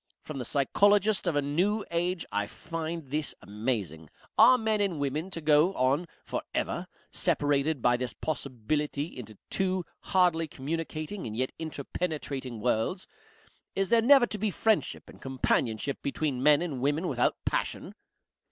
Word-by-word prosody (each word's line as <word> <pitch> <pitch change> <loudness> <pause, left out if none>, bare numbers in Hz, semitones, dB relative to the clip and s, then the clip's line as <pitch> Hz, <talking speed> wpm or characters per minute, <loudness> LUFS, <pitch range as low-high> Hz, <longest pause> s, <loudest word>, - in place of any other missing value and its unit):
From 150 -3 -6
the 125 - -3
Psychologist 205 - +3
of 170 - +1
a 145 - +2
New 185 +9 +1
Age 175 0 0
I 105 0 0
find 160 +1 -5
this 150 0 -1
amazing. 100 - -3 0.3
Are 255 - +8
men 220 -3 +1
and 195 -5 0
women 145 +5 -2
to 170 -3 -5
go 155 +5 +4
on 135 +7 +2 0.2
for - - -3
ever - - -1 0.2
separated 145 -1 +1
by 120 0 +4
this 125 0 -3
possibility 145 +2 -3
into 110 -4 -9
two 185 -2 0
hardly 175 -3 +2
communicating 155 - -4
and 110 0 -5
yet 130 +1 0
interpenetrating 145 -5 -4
worlds? 120 - 0 0.7
Is 195 -1 0
there 230 0 +5
never 265 +1 +7
to 215 -3 -6
be 215 +1 +1
friendship 220 +2 0
and - - -14
companionship 130 -1 0
between 140 -2 -1
men 150 +3 +5
and 145 -8 -4
women 145 +6 +1
without 125 -5 +1
passion?" - - -2
150 Hz, 150 wpm, -29 LUFS, 130-180 Hz, 0.7 s, Are